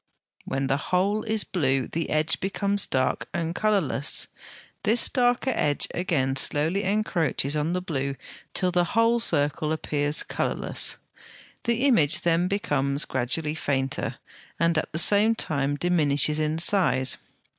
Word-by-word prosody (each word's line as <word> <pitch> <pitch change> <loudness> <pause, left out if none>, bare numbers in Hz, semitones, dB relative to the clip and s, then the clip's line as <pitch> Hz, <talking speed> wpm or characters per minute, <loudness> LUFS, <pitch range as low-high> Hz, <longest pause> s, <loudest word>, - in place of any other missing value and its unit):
When 135 0 -2
the 135 +1 0
whole 190 +8 0
is 220 -1 0
blue 135 -7 0
the 165 0 -4
edge 155 +1 0
becomes 200 +1 0
dark 130 -1 -1
and 165 0 -2
colourless. 185 -9 +1 0.5
This 225 +2 +3
darker 245 0 +1
edge 145 -7 0
again 135 -7 -1
slowly 155 +8 +1
encroaches 170 -8 0
on 150 +3 -1
the 180 0 -2
blue 140 -5 -3 0.4
till 180 -1 +2
the 175 0 +2
whole 230 +1 +3
circle 150 -6 0
appears 150 -1 0
colourless. - - -1 0.7
The 235 +1 0
image 175 - +3
then 170 +1 +1
becomes 145 -8 0
gradually 135 +5 -2
fainter, 135 -3 -2 0.4
and 170 +1 +2
at 155 - -1
the 155 - -4
same 210 +6 +3
time 140 -7 -1
diminishes 150 -3 +1
in 155 +1 -1
size. 165 -7 +3
160 Hz, 135 wpm, -25 LUFS, 145-200 Hz, 0.7 s, This